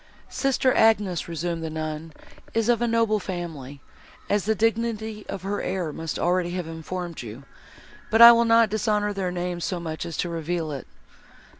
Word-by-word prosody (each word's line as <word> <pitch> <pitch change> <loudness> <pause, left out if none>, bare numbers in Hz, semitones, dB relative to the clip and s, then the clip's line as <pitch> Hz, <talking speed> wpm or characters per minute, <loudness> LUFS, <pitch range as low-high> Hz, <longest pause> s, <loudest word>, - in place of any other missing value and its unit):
"Sister 265 -1 +1
Agnes," 210 -6 +2
resumed 165 0 -3
the 160 - -3
nun, 155 0 -5 0.4
"is 225 0 +1
of 240 -1 +3
a 240 - +2
noble 225 -2 +2
family, 160 -8 -6 0.5
as 205 -1 +1
the 220 +1 +1
dignity 220 -1 -1
of 190 - -5
her 200 +1 -2
air 180 -5 -2
must 165 +1 -4
already 175 0 +1
have 180 -2 -3
informed 165 +1 -6
you, 120 +3 -9 0.7
but 225 - +2
I 235 0 +12
will 235 0 +4
not 230 -2 +4
dishonour 210 -1 0
their 190 -2 -2
name 175 0 -3
so 175 +1 -2
much 160 -2 -5
as 165 - -6
to - - -1
reveal 165 -1 -3
it. 140 -3 -6
180 Hz, 175 wpm, -25 LUFS, 165-220 Hz, 0.7 s, I